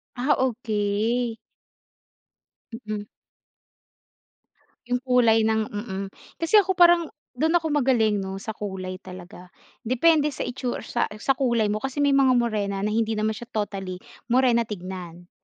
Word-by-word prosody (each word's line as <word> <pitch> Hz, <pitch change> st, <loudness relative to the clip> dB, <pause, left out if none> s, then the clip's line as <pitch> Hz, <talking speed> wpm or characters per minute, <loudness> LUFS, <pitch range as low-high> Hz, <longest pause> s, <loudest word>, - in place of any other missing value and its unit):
Ah, 265 Hz, +4 st, +2 dB
okey. 225 Hz, -1 st, -1 dB, 1.5 s
Mm. 210 Hz, -1 st, -3 dB, 1.9 s
Yung 245 Hz, -, +2 dB
kulay 230 Hz, -3 st, +4 dB
ng 220 Hz, -1 st, +1 dB
mm. 205 Hz, -2 st, -5 dB, 0.4 s
Kasi 330 Hz, +6 st, +4 dB
ako 380 Hz, -2 st, +4 dB
parang 345 Hz, -1 st, +5 dB, 0.3 s
dun 315 Hz, +7 st, 0 dB
ako 325 Hz, -2 st, +1 dB
magaling 245 Hz, -7 st, +2 dB
no 195 Hz, 0 st, -5 dB
sa 220 Hz, -, -4 dB
kulay 185 Hz, -2 st, -5 dB
talaga. 180 Hz, 0 st, -12 dB, 0.3 s
Depende 300 Hz, +5 st, +3 dB
sa -, -, -6 dB
itsu 250 Hz, 0 st, -3 dB
sa 240 Hz, -, -1 dB, 0.2 s
sa 270 Hz, -, +2 dB
kulay 235 Hz, -5 st, +1 dB
mo 210 Hz, -, 0 dB
kasi 270 Hz, +3 st, -3 dB
may 285 Hz, -, +3 dB
mga 270 Hz, -2 st, +4 dB
morena 210 Hz, -5 st, 0 dB
na 210 Hz, -, +1 dB
hindi 225 Hz, 0 st, 0 dB
naman 215 Hz, +1 st, 0 dB
siya 240 Hz, -, -9 dB
totally 195 Hz, -3 st, -4 dB, 0.3 s
morena 240 Hz, -2 st, +3 dB
tignan. 180 Hz, -3 st, -8 dB
225 Hz, 135 wpm, -24 LUFS, 205-260 Hz, 1.9 s, parang